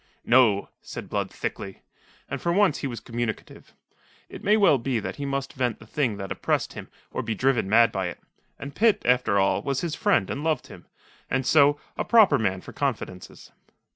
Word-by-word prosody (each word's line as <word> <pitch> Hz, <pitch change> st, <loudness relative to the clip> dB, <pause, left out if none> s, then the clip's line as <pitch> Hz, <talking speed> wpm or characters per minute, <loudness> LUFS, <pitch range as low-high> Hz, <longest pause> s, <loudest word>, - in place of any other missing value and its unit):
"No," 115 Hz, -5 st, +4 dB
said -, -, -8 dB
Blood -, -, -1 dB
thickly. 95 Hz, -1 st, -6 dB, 0.4 s
And 140 Hz, -, -5 dB
for 170 Hz, -, 0 dB
once 195 Hz, -3 st, +3 dB
he 140 Hz, -, -3 dB
was 120 Hz, -4 st, -6 dB
communicative. 115 Hz, -1 st, -6 dB, 0.5 s
It -, -, -10 dB
may 210 Hz, +2 st, +4 dB
well 185 Hz, -10 st, +4 dB
be 120 Hz, 0 st, -1 dB
that 105 Hz, -, -6 dB
he 140 Hz, -1 st, -4 dB
must 140 Hz, 0 st, -3 dB
vent 125 Hz, -4 st, -1 dB
the -, -, -15 dB
thing 120 Hz, -3 st, -1 dB
that 95 Hz, -1 st, -6 dB
oppressed -, -, -1 dB
him -, -, -9 dB, 0.2 s
or -, -, -3 dB
be 110 Hz, -, -3 dB
driven 125 Hz, -3 st, +1 dB
mad 115 Hz, +2 st, +5 dB
by 95 Hz, -4 st, -2 dB
it. 85 Hz, -, -7 dB, 0.4 s
And 140 Hz, 0 st, -8 dB
Pitt, 220 Hz, -1 st, +2 dB
after 125 Hz, -5 st, +2 dB
all, 95 Hz, 0 st, +2 dB
was 140 Hz, -2 st, -2 dB
his 170 Hz, -3 st, -3 dB
friend 160 Hz, -, +1 dB
and 145 Hz, -, -4 dB
loved 160 Hz, -1 st, 0 dB
him, -, -, -14 dB, 0.4 s
and, 130 Hz, -1 st, 0 dB
so, 145 Hz, 0 st, +4 dB, 0.2 s
a -, -, +1 dB
proper 205 Hz, -, +5 dB
man 95 Hz, -4 st, -1 dB
for -, -, -11 dB
confidences. 90 Hz, -1 st, -5 dB
130 Hz, 200 wpm, -25 LUFS, 110-145 Hz, 0.5 s, mad